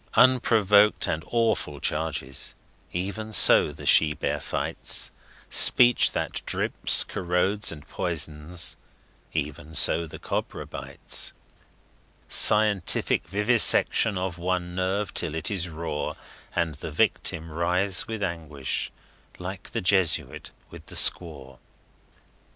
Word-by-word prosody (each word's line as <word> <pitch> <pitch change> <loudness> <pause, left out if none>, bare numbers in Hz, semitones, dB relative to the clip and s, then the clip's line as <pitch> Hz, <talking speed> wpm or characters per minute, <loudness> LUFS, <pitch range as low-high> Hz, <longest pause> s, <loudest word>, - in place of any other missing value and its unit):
Unprovoked 105 -6 +4
and 80 -2 -3
awful 115 -1 -1
charges 75 -4 -3 0.4
even 100 +5 -5
so - - +6
the - - -12
she 75 -1 +4
bear 75 - -3
fights; - - -1 0.4
Speech 120 -1 +4
that - - -4
drips, - - +3
corrodes 95 +4 -1
and 75 -4 -11
poisons 80 0 -2 0.5
even 75 +1 -5
so 85 +1 +4
the - - -10
cobra - - -5
bites; - - -2 0.9
Scientific 105 -4 +2
vivisection 105 -1 +2
of 90 -1 -4
one 90 0 -3
nerve 95 +3 -2
till 80 - -1
it 80 - -2
is 90 -3 -1
raw, 80 -2 -5 0.4
And 80 -2 -1
the 75 - -8
victim 80 +2 -1
writhes 90 +4 0
with 110 -2 -5
anguish 80 -7 -4 0.5
like 95 +2 -8
the 115 - -4
Jesuit 95 -4 0 0.2
with - - -12
the - - -11
squaw! 70 -7 +2
90 Hz, 110 wpm, -25 LUFS, 80-100 Hz, 0.9 s, so